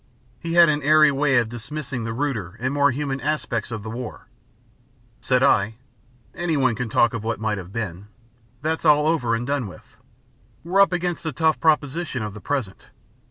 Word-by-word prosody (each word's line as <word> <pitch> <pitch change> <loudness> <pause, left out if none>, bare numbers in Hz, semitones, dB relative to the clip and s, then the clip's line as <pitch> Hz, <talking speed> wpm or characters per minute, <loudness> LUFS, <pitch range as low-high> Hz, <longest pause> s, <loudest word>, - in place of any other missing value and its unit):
He 165 0 -4
had 170 0 +7
an 150 -1 +1
airy 155 +1 +5
way 140 -1 +2
of 120 -2 +2
dismissing 125 +1 -6
the 115 - -3
ruder 115 -7 -3
and 130 +3 -1
more 145 0 +4
human 135 0 -3
aspects 135 -8 -2
of 110 -3 -5
the 110 - -6
war. 120 0 -7 0.9
Said 125 0 +1
I: 110 -5 +3 0.6
"Anyone 145 -8 +1
can 115 +1 -4
talk 120 +2 +3
of 115 -3 -4
what 115 +1 -2
might 110 -2 -1
have 90 0 -10
been. 100 -3 -5 0.6
But 155 - 0
that's 160 +1 -2
all 150 -1 +5
over 145 -8 +1
and 120 +1 -3
done 140 -4 -1
with. 90 - -15 0.7
We're 185 +4 +3
up 200 - +5
against 175 -1 -2
the 160 - -3
tough 160 0 +1
proposition 150 -4 0
of 105 -1 -5
the 105 - -10
present. 125 -4 -4
135 Hz, 190 wpm, -23 LUFS, 115-155 Hz, 0.9 s, had